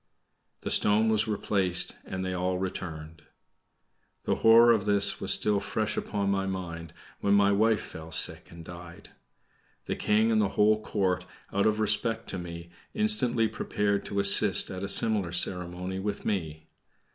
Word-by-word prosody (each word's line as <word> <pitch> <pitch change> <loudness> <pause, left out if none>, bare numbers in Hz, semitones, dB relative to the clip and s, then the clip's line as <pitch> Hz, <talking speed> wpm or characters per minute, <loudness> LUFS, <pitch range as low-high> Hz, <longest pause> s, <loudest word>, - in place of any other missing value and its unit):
The - - -5
stone 105 +2 +4
was 110 0 +1
replaced 95 -4 -1
and 95 0 -5
they 95 - -3
all 90 0 -2
returned. 80 -4 -6 1.0
The - - -1
horror 115 +1 +6
of 110 -3 +1
this 100 -1 +1
was - - +1
still 105 -1 +2
fresh 105 +1 -3
upon 100 -2 -2
my 95 0 -1
mind, 85 -4 -6 0.3
when 100 0 +1
my 100 0 +3
wife 110 +2 +2
fell 80 0 -11
sick - - -1
and 85 -1 -13
died. 85 0 -12 0.8
The - - -3
King 110 +2 +1
and 110 -1 +2
the 100 - 0
whole 105 +1 +3
Court, 95 -4 -2 0.3
out 100 +2 +1
of 110 0 0
respect 110 +1 0
to 95 - -5
me, 85 -1 -9 0.2
instantly 130 - +1
prepared 105 -2 -2
to 100 - -3
assist 100 0 +3
at 95 -1 -7
a 100 - -4
similar 105 -5 +4
ceremony 90 +1 0
with 100 +1 -5
me. 80 -6 -4
100 Hz, 160 wpm, -27 LUFS, 90-110 Hz, 1.0 s, horror